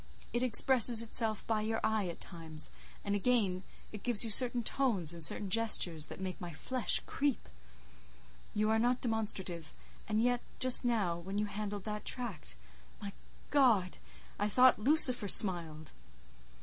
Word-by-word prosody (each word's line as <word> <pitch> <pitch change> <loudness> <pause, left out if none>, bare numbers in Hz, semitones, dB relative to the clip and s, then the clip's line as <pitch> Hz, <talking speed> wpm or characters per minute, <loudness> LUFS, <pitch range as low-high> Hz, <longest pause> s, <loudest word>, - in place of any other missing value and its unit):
It 240 - -1
expresses 245 -1 +5
itself 220 -2 -1
by 220 -2 -1
your 225 +1 -2
eye 220 -3 0
at 170 - -8
times; 160 -3 -4 0.3
and 200 - -2
again, 205 -4 0 0.3
it 210 - -9
gives 240 -4 -1
you 225 - -4
certain 240 +2 +2
tones 215 - -1
and 170 -1 -8
certain 195 +5 -2
gestures 180 -8 +2
that - - -10
make 185 -1 -6
my 175 -1 -7
flesh 245 - 0
creep. 280 -2 -2 1.1
You 215 +1 0
are 220 - +1
not 245 +2 0
demonstrative, 190 -8 -4 0.4
and 215 0 0
yet, 245 +1 0 0.2
just 255 0 +4
now—when 195 -5 -2
you 210 - 0
handled 205 -1 -6
that 210 0 -6
tract—my 60 - -8 0.4
God! 230 -11 +2 0.4
I 205 +1 -1
thought 255 +3 +4
Lucifer 255 -3 +3
smiled." 165 -6 +2
210 Hz, 145 wpm, -32 LUFS, 180-240 Hz, 1.1 s, expresses